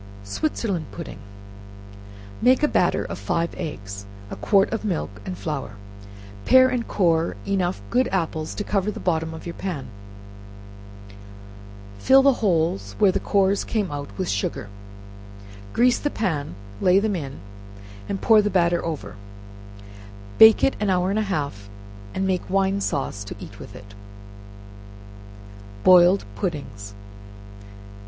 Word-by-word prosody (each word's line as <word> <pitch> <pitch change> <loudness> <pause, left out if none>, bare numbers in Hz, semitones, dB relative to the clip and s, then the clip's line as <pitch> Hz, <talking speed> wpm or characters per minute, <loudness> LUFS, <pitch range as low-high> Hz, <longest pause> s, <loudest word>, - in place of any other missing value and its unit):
Switzerland 185 - -2
Pudding. 155 - -8 1.2
Make 255 +4 +4
a - - +5
hatter - - +1
of - - -6
five 170 0 -1
eggs, 100 -8 -7 0.2
a - - -4
quart 200 -1 +2
of 225 - -3
milk 180 - -2 0.2
and 90 - -4
flour; 125 +1 -4 0.7
pare 260 0 +6
and 245 -2 -2
core 165 -4 +1
enough 190 -2 -1
good 250 +1 +2
apples 160 -4 -2
to 210 - -3
cover 200 -1 0
the - - -5
bottom 160 -2 -1
of 160 0 -9
your 170 - -5
pan, 150 -11 -5 2.1
fill 270 - +5
the 275 0 +5
holes 160 - 0
where 200 -2 +4
the - - -1
cores 200 -1 +1
came 210 -6 -2
out 145 -1 -5
with 185 -2 -2
sugar, 100 0 -2 1.0
grease 245 +1 +3
the 290 - -1
pan, 160 - -2 0.3
lay 180 +1 +4
them 205 0 +1
in, 140 -5 -6 0.7
and 195 - -3
pour 220 -2 +6
the 210 - 0
batter 175 -2 +2
over, 135 - -5 1.2
bake 220 0 +8
it 270 - +3
an 210 - 0
hour 185 0 +1
and 210 - 0
a 210 -2 -2
half, 140 - -3 0.5
and 190 - 0
make 185 -2 -1
wine 195 +1 +1
sauce 135 - -2
to 100 - -8
eat - - -11
with - - -11
it. 100 0 -13 1.9
Boiling 180 +1 +6
Puddings. 100 - -5
180 Hz, 140 wpm, -23 LUFS, 145-205 Hz, 2.1 s, bake